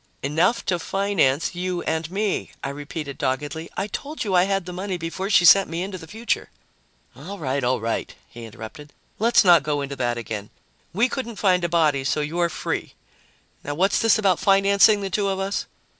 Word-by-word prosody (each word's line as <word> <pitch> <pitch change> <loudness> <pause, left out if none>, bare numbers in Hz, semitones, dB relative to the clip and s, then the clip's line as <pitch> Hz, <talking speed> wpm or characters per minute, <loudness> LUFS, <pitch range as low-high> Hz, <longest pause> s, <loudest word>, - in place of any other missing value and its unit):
"Enough 170 - +1
to 175 -2 0
finance 175 -7 +1
you 180 0 -3
and 160 0 -2
me," 200 +2 -2
I 140 - -2
repeated 145 0 -6
doggedly. 145 +5 -3
"I 195 - 0
told 285 +9 -5
you 200 -4 -2
I 180 0 +5
had 195 -2 -1
the 180 - -7
money 185 +1 -3
before 175 +3 -4
she 175 -4 +5
sent 190 +2 +7
me 165 +2 -3
into 190 -1 -6
the 160 - -11
future 225 +7 -3 0.3
" - - -38
"All 200 - -8
right, 140 -4 -2
all 125 +1 +1
right," 115 +1 -3 0.2
he 120 -1 -10
interrupted. 115 +6 -10 0.3
"Let's 230 +2 +4
not 175 -3 +7
go 145 -1 -1
into 140 0 -5
that 120 -1 -1
again. 110 -3 -5 0.4
We 225 +8 +2
couldn't 235 -3 -5
find 185 -3 +2
a 170 - 0
body, 155 -5 +2
so 150 +3 0
you're 170 +3 0
free. - - -4 0.7
Now 145 - -4
what's 190 +5 +2
this 225 0 +4
about 195 -5 +2
financing 200 +1 +4
the 195 -1 -4
two 200 +2 0
of 195 -1 -1
us?" 195 +1 -2
175 Hz, 200 wpm, -23 LUFS, 145-195 Hz, 0.7 s, sent